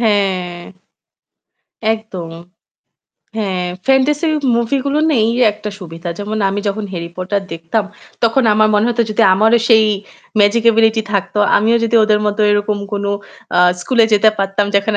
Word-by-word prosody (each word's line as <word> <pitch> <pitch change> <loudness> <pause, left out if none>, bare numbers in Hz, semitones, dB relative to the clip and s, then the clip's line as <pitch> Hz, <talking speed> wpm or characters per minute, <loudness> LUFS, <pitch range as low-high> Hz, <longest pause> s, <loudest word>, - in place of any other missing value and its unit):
হ্যাঁ 195 -5 0 1.4
একদম। 195 -7 -7 1.1
হ্যাঁ, 190 -4 -2 0.2
fantasy 275 +4 +2 0.3
movie 235 +4 0
গুলোর 290 +2 0
না 300 - +2
এই 225 - +1 0.2
একটা 210 0 -7
সুবিধা। 170 -1 -8
যেমন 210 +1 -4
আমি 200 +1 -2
যখন 205 +1 -3
'Harry 170 -1 -6
Potter' 190 +2 -2
দেখতাম 165 +6 -2 0.4
তখন 230 +3 +2
আমার 215 0 +3
মনে 210 +1 +2
হতো 235 0 +1
যদি 215 +2 +1
আমারও 220 +4 +3
সেই 220 -2 +6 0.6
magic 210 +3 +3
ability 225 0 +2
থাকতো, 200 +1 -2 0.2
আমিও 225 +3 +2
যদি 230 - -1
ওদের 215 -1 +2
মতো 210 +1 -1
এরকম 205 0 0
কোনো, 200 0 -2 0.5
আ - - +3 0.2
স্কুলে 235 +4 +2
যেতে 215 +1 +5
পারতাম 195 +1 0
যেখানে 200 +1 +1
210 Hz, 150 wpm, -16 LUFS, 195-225 Hz, 1.4 s, সেই